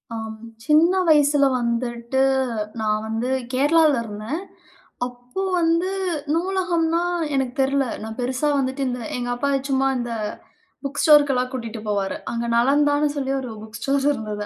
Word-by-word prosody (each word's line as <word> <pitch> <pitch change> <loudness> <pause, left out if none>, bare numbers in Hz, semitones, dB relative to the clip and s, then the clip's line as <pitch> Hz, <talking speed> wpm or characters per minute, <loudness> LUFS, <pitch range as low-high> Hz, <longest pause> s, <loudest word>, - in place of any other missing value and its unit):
ஆம். 220 -1 -5 0.3
சின்ன 310 +4 +5 0.2
வயசுல 290 -2 +5
வந்துட்டு 235 +1 -2 0.6
நான் 215 0 0
வந்து 225 +3 -2 0.2
கேரளால 300 +3 +4
இருந்தேன். 220 - -5 0.7
அப்போ 245 +8 -7 0.2
வந்து 335 +2 +2 0.4
நூலகம்ன்னா, 340 -2 0 0.3
எனக்குத் 265 -1 -1
தெர்ல. 275 +1 +2 0.2
நான் 220 0 -6
பெருசா 255 +4 0
வந்துட்டு 265 0 -1
இந்த 250 0 -3 0.2
எங்க 245 0 -3
அப்பா 280 +4 -1 0.2
சும்மா 270 0 +2
இந்த 240 -1 -3 0.7
புக் 275 - -3
ஸ்டோர்க்கு 295 -2 +6
எல்லாம் 250 0 0
கூட்டிட்டு 230 -3 -5
போவாரு. 200 -2 -1 0.2
அங்கே 235 0 -2
நலந்தான்னு 290 +4 +3
சொல்லி 270 -1 -1
ஒரு 250 -3 -6
புக் 220 +1 -9
ஸ்டோர் 275 +3 +1
இருந்தது, 210 -4 -4
265 Hz, 135 wpm, -22 LUFS, 235-295 Hz, 0.7 s, ஸ்டோர்க்கு